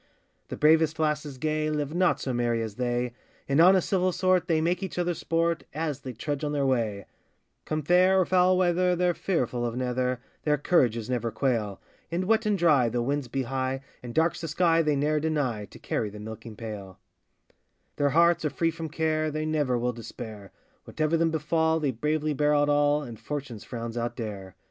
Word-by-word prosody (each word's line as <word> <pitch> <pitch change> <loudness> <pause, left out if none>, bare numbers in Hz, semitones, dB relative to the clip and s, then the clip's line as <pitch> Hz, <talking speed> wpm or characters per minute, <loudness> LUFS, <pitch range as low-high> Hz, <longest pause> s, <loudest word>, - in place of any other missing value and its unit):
The - - -6
bravest 155 0 +4
lasses 150 -2 -1
gay, 155 +2 -1
Live 150 -1 -2
not 180 +1 +2
so 130 - -3
merry 120 -1 0
as 110 -1 -6
they; 120 -1 -1 0.3
In 140 +2 +2
honest 185 +1 +5
civil 185 -1 +2
sort 185 -1 +2
they 160 -2 +2
make 175 +3 0
each 190 -2 -5
other 175 0 +1
sport, 165 0 0
As 155 -3 -2
they 130 -2 -7
trudge 145 +5 -4
on 150 0 -1
their 140 -2 +1
way; 110 -7 0 0.6
Come 155 0 -2
fair 185 +4 +4
or 185 - +3
foul 185 0 +4
weather, 180 0 +2
they're 175 0 +2
fearful 125 -10 -1
of 120 -1 -2
neither, 125 0 -1 0.2
Their 150 -1 +1
courages 120 -8 +2
never 120 -2 -1
quail. 110 -4 -1 0.3
In 175 +2 -1
wet 220 +2 +2
and 210 -1 +2
dry, 150 -9 +4
though 120 +1 -1
winds 140 +1 -1
be 135 +2 -2
high, 130 +1 -2 0.2
And 120 -1 -8
dark's 165 +1 +2
the 165 - -4
sky, 165 +1 +3
they 150 -2 +1
ne'er 150 +2 +1
deny 145 -9 -1
To - - -14
carry 105 - -2
the 105 +1 -10
milking 110 +1 -8
pail. 105 -4 -8 1.0
Their 145 0 +2
hearts 170 +3 +4
are 150 - +1
free 165 +4 0
from 165 0 -6
care, 155 0 0
They 155 +1 -3
never 145 -5 +1
will 125 +1 -1
despair; 110 -3 -9 0.3
Whatever 155 +1 0
them 165 0 +2
befal, 160 +1 +1
they 145 -3 0
bravely 150 +5 -1
bear 150 +1 +2
out 145 0 +3
all, 145 0 +3
And 120 -5 -9
fortune's 125 -3 -6
frowns 115 -1 -6
outdare. 110 -5 -5
150 Hz, 195 wpm, -27 LUFS, 120-165 Hz, 1.0 s, honest